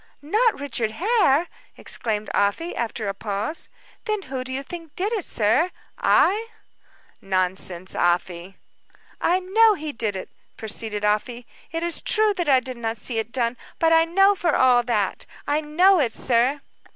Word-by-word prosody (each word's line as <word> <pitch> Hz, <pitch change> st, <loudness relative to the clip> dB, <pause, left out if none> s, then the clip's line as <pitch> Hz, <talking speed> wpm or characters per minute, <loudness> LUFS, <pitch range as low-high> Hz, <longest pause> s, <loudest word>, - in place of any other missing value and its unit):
"Not 430 Hz, -, +2 dB
Richard 245 Hz, -6 st, -2 dB
Hare!" 355 Hz, -, +3 dB, 0.3 s
exclaimed 215 Hz, -2 st, -3 dB
Afy, 205 Hz, -, 0 dB
after 225 Hz, -2 st, -3 dB
a 195 Hz, -, -1 dB
pause. 205 Hz, +9 st, -2 dB, 0.4 s
"Then 425 Hz, -2 st, -2 dB
who 260 Hz, -3 st, -5 dB
do 260 Hz, -, -8 dB
you 265 Hz, +1 st, -3 dB
think 330 Hz, 0 st, -9 dB
did 405 Hz, +5 st, -1 dB
it, 420 Hz, -5 st, -1 dB
sir 230 Hz, -, +1 dB, 0.3 s
I?" 430 Hz, +4 st, +3 dB, 0.7 s
"Nonsense, 185 Hz, -1 st, -2 dB
Afy." 175 Hz, +1 st, -1 dB, 0.6 s
"I 360 Hz, +2 st, +2 dB
know 425 Hz, +4 st, +4 dB
he 310 Hz, -3 st, -5 dB
did 220 Hz, -6 st, -3 dB
it," 190 Hz, -, -6 dB, 0.3 s
proceeded 215 Hz, -1 st, -2 dB
Afy. 235 Hz, +4 st, -1 dB, 0.3 s
"It 330 Hz, 0 st, -3 dB
is 345 Hz, -1 st, 0 dB
true 430 Hz, -1 st, +2 dB
that 350 Hz, -5 st, -2 dB
I 265 Hz, -2 st, +6 dB
did 255 Hz, 0 st, -7 dB
not 230 Hz, -1 st, -3 dB
see 225 Hz, +2 st, -2 dB
it 225 Hz, +1 st, -4 dB
done, 240 Hz, -1 st, -1 dB, 0.2 s
but 325 Hz, -1 st, +3 dB
I 325 Hz, 0 st, +5 dB
know 390 Hz, +4 st, +4 dB
it 405 Hz, -, -3 dB
for 345 Hz, -4 st, +1 dB
all 250 Hz, -1 st, +5 dB
that. 220 Hz, -5 st, -2 dB, 0.2 s
I 295 Hz, +1 st, 0 dB
know 355 Hz, +5 st, +4 dB
it, 240 Hz, -6 st, +1 dB
sir." 255 Hz, +4 st, +1 dB
260 Hz, 165 wpm, -23 LUFS, 220-345 Hz, 0.7 s, I